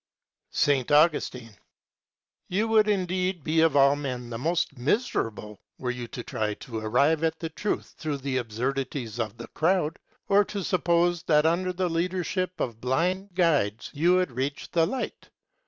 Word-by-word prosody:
S. - - +2 0.2
Augustine. 145 -7 +2 0.9
You 205 +5 0
would 215 -1 +4
indeed 185 -3 0
be 160 +2 +2
of 160 -2 +3
all 140 0 +6
men 125 -4 -5
the 115 - -3
most 170 +1 0
miserable 120 - -1 0.2
were 125 -1 -2
you 125 -1 -6
to 120 - -7
try 105 -2 -2
to 115 0 -6
arrive 140 +9 +2
at 160 0 0
the 165 - -4
truth 205 +6 -3
through 150 -3 -2
the 135 -1 -2
absurdities 125 0 -3
of 110 -1 -3
the 115 - -8
crowd, 165 -1 +1 0.3
or 200 +1 +5
to 200 -1 -5
suppose 175 -1 +2
that 150 -1 +4
under 180 +3 +2
the 180 0 -1
leadership 180 +2 -2
of 115 -3 -3
blind 180 +9 -1
guides 145 - +1
you 170 +5 +3
would 185 -5 +1
reach 135 +4 -4
the 165 -2 +3
light. 260 +4 -5
155 Hz, 160 wpm, -27 LUFS, 125-180 Hz, 0.9 s, all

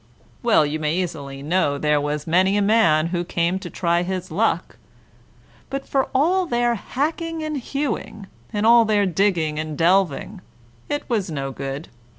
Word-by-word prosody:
Well, 225 -10 +4
you 150 +2 -3
may 155 +1 0
easily 145 -7 -4
know 150 -2 +1
there 150 0 +1
was 150 0 -3
many 185 +4 +3
a - - +2
man 170 -8 +4
who 175 0 -1
came 175 +2 -1
to - - -7
try 170 -1 0
his 185 -1 -4
luck; 215 +8 0 0.9
but 275 0 -5
for 270 -1 0
all 355 +7 +2
their 240 -3 +1
hacking 320 - -3
and 305 -1 -3
hewing, 275 -6 -4 0.3
and 210 -1 -1
all 235 +1 +7
their 210 -2 +2
digging 175 -5 +1
and 155 -1 -4
delving, 185 +2 +1 0.5
it 290 - -3
was 215 -7 -1
no 135 -3 -3
good. 135 +3 -6
185 Hz, 165 wpm, -22 LUFS, 155-235 Hz, 0.9 s, all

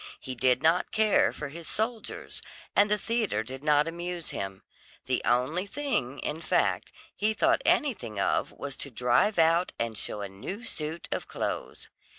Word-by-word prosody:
He 130 - -5
did 125 +1 +2
not 165 +3 +4
care 215 -1 +4
for 150 - -6
his 165 +3 -9
soldiers, 220 +1 -3 0.3
and 205 0 +5
the 210 - +3
theatre 215 - 0
did 130 +4 -8
not 150 0 +4
amuse 170 0 -3
him; 95 -1 -5 0.4
the 130 -1 +1
only 140 +11 +1
thing, 200 - -1
in 155 +2 -3
fact, - - +1 0.2
he 215 +1 +1
thought - - +3
anything 185 - +1
of - - +1
was 140 -1 -6
to 140 - -4
drive 125 - +2
out 165 +2 +4
and 115 -1 -2
show 105 0 -4
a 100 - -3
new 105 - -7
suit 160 -5 -3
of - - -2
clothes. - - -4
160 Hz, 165 wpm, -29 LUFS, 125-205 Hz, 0.4 s, and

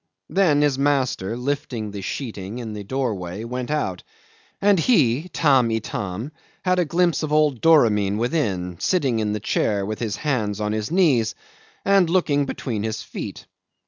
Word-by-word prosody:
Then 160 -7 +3
his 140 -2 +1
master, 130 -7 0
lifting 125 -5 -3
the 100 -1 -6
sheeting 105 -1 -5
in 115 -3 -5
the 105 -1 -6
doorway, 105 -5 -3
went 125 +2 -4
out, 95 -12 -1 0.6
and 200 -2 +4
he, 155 - +2
Tamb' 135 -8 +3
Itam, 110 +2 -3 0.3
had 185 0 +3
a 175 - +2
glimpse 170 +1 +1
of 155 -2 -3
old 150 -5 +2
Doramin 105 -11 +4
within, 100 - -1
sitting 135 -11 +1
in 105 -1 0
the 105 - -2
chair 100 -1 0
with 110 +1 -4
his 110 -4 -2
hands 110 -9 -1
on 105 0 -1
his 110 -1 -2
knees, 145 - +2 0.5
and 195 -3 +4
looking 150 -5 +2
between 115 -6 -3
his 110 0 -3
feet. - - -7
125 Hz, 160 wpm, -23 LUFS, 105-150 Hz, 0.6 s, and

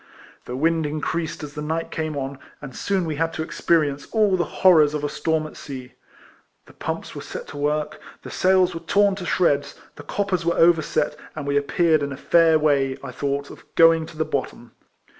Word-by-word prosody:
The 125 - -5
wind 160 +2 +1
increased 155 +2 -3
as 145 -1 -7
the 150 - -6
night 160 +2 -3
came 155 -2 -3
on, 135 0 -4 0.2
and 135 -4 -9
soon 195 -3 -1
we 155 -2 -3
had 165 +1 0
to 160 - -3
experience 150 -4 0
all 210 -4 +3
the 175 - +1 0.2
horrors 155 -5 +6
of 150 - -3
a 145 - 0
storm 160 +1 -1
at 155 - -10
sea. 130 -3 -9 0.7
The - - -17
pumps - - -5
were - - -7
set - - -7
to 145 - -8
work; 150 +1 -1 0.2
the - - -8
sails 185 -1 +3
were 165 - -5
torn 200 +4 +3
to 180 - -6
shreds; 145 -6 +1 0.2
the 145 - -9
coppers 190 +2 -1
were 170 +1 0
overset; 155 -3 +3 0.2
and 155 -2 -5
we 140 0 -1
appeared 155 +2 +2
in 140 0 -2
a 135 - -6
fair 165 -2 +4
way, 140 -3 +1
I - - -6
thought, 140 0 -3
of - - -13
going 165 -1 +5
to 155 - -13
the 155 - 0
bottom. 135 -5 -4
155 Hz, 205 wpm, -23 LUFS, 145-165 Hz, 0.7 s, horrors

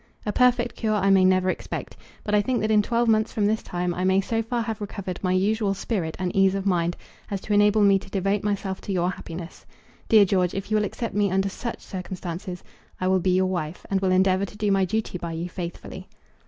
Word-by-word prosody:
A 210 - 0
perfect 250 -1 +3
cure 215 -2 0
I 195 -1 +2
may 190 -1 +6
never 185 0 +3
expect, - - -6 0.3
but 210 - -3
I 210 - +5
think 245 +4 0
that 215 +1 0
in 210 -1 +5
twelve 235 +2 0
months 220 0 +2
from 210 - 0
this 215 +1 +1
time 175 0 -2
I 180 - -3
may 190 +1 +3
so 225 +3 -1
far 235 +1 -2
have 220 -1 -4
recovered 195 -3 -5
my 185 - 0
usual 200 +2 +1
spirit 185 -6 -3
and 185 -1 -3
ease 195 0 +4
of 195 0 -3
mind 175 -3 +1 0.3
as 200 - -2
to 210 - -2
enable 205 +1 +4
me 195 -1 +5
to 195 - -13
devote 195 +1 0
myself 200 -2 -2
to - - -5
your 180 -1 +1
happiness. 170 -1 -8 0.5
Dear 215 -2 +7
George, 180 -2 +1
if 195 +2 -5
you 215 - +4
will 210 - +1
accept 230 +3 -4
me 205 -1 +2
under 195 +1 +1
such 235 +4 -6
circumstances, 180 -1 -6 0.4
I 185 - 0
will 190 0 +3
be 185 0 +2
your 185 0 +3
wife, 175 -3 -3
and 195 -1 +1
will 190 -1 +2
endeavour 185 +1 +3
to 205 - -12
do 210 -1 +1
my 195 -1 +3
duty 215 -2 -2
by 170 -1 -5
you 165 +2 -3
faithfully. 175 -1 -7
195 Hz, 235 wpm, -25 LUFS, 185-210 Hz, 0.5 s, Dear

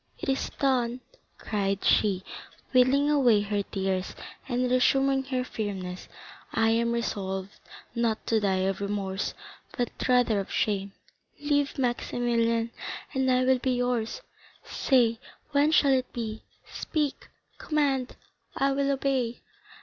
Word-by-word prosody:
It - - -4
is 270 - 0
done," 255 -2 +1 0.4
cried 200 -2 -2
she, 195 -3 +3 0.5
wiping 260 +3 +4
away 245 -8 +4
her 205 0 -1
tears, 190 -1 -2 0.3
and 250 0 0
resuming 270 +2 +3
her 255 -2 -1
firmness, 190 -6 -5 0.4
"I 225 0 +2
am 235 +1 +2
resolved 195 -4 -3 0.3
not 235 -2 0
to 225 - +2
die 190 -2 +1
of 195 +1 -1
remorse, 200 -1 -2 0.4
but 245 - 0 0.2
rather 245 -4 +4
of 195 - -5
shame. 200 -2 0 0.5
Live, 290 -1 0
Maximilian, 235 -2 0 0.4
and 265 -1 +1
I 255 0 +3
will 260 0 +4
be 255 +1 0
yours. 245 -2 -1 0.4
Say 235 -4 +2 0.3
when 290 +1 +4
shall 280 -3 +5
it 255 -1 0
be? 220 -2 -4 0.3
Speak, 300 -4 -3 0.3
command, 275 -4 0 0.4
I 275 0 +2
will 275 0 +1
obey." 265 -3 -1
240 Hz, 125 wpm, -27 LUFS, 205-265 Hz, 0.5 s, shall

